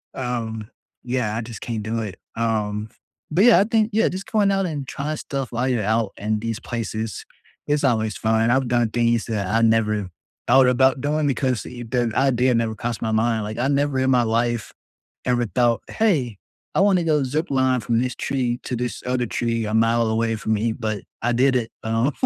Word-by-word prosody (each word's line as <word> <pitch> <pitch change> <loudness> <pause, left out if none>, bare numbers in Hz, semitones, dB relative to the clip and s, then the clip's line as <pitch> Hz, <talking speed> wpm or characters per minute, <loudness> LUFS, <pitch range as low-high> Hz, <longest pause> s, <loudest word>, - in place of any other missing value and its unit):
Um, 115 -4 -4 0.3
yeah, 120 -4 -1
I 115 - -1
just 115 -2 -8
can't 115 -3 -3
do 115 +2 -2
it, 105 -4 -6 0.2
um, 110 -2 -1 0.4
but 180 +6 +3
yeah, 235 -7 +7
I - - +5
think 220 0 +1
yeah, 220 +2 +3
just 195 +5 -7
going 205 -3 +3
out 195 -1 +1
and 145 -4 -4
trying 150 +3 -3
stuff 135 -3 -4
while 125 +2 -1
you're 120 -4 +1
out 110 0 +1
in 105 +1 -1
these 115 +1 -3
places 110 -4 -4 0.4
is 145 0 0
always 110 -5 +1
fun. 110 +1 +2
I've 130 0 +2
done 120 -2 +2
things 120 -1 +1
that 105 -4 -2
I 115 +4 +2
never 105 -4 +2 0.4
thought 130 +1 +6
about 130 +1 +3
doing 150 +1 0
because 130 -3 0
the 120 -2 -8 0.3
idea 130 -1 +2
never 115 -1 0
crossed 120 +1 -4
my 110 - -1
mind, 110 0 +1
like, 105 +1 -5
I 125 +3 +1
never 140 -1 +1
in 130 0 +2
my 125 -2 +4
life, 115 0 0 0.5
ever, 120 -1 +1
thought, 120 -1 +1
"Hey, 145 - +1 0.4
I - - +4
wanna 195 -3 +4
go 155 -3 +2
zipline 130 -3 +1
from 115 +2 +1
this 125 0 -1
tree 125 -2 -2
to 125 - -2
this 125 +1 -3
other 125 -1 0
tree 115 -1 -1
a 105 - -3
mile 115 +1 +3
away 115 +1 0
from 110 0 -1
me," 110 +1 0
but 110 -3 -3 0.2
I 120 - +2
did 130 +2 +3
it, 120 -2 -1
um 115 +5 +1
120 Hz, 200 wpm, -22 LUFS, 110-130 Hz, 0.5 s, yeah